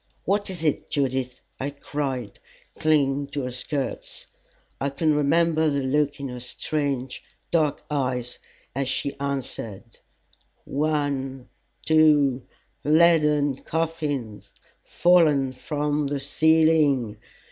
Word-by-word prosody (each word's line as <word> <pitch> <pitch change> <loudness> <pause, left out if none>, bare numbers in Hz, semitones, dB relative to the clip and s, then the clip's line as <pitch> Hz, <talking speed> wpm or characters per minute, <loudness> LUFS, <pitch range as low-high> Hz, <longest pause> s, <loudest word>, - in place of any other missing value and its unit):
"What 205 +1 0
is 175 -4 -5
it, 155 -3 0
Judith?" 130 -3 -1 0.2
I 135 - -2
cried, 140 -6 -4 0.4
clinging 145 -2 +2
to 140 -1 -4
her 125 - -3
skirts. 145 - -4 0.5
I 140 - 0
can 155 +3 +1
remember 160 +2 +2
the 140 -1 -1
look 145 +2 0
in 140 - -4
her 125 0 -6
strange 135 0 -3 0.3
dark 155 -4 +1
eyes 125 -4 -2 0.3
as 135 0 -2
she 140 +1 -1
answered: 120 -6 -5 0.7
"One 140 -3 -2 0.4
two 150 -5 +4 0.4
leaden 150 -3 +4
coffins, 150 -10 -3 0.3
fallen 155 -7 +3
from 150 +2 -1
the 140 0 -2
ceiling!" 150 -5 +3
145 Hz, 105 wpm, -25 LUFS, 135-155 Hz, 0.7 s, two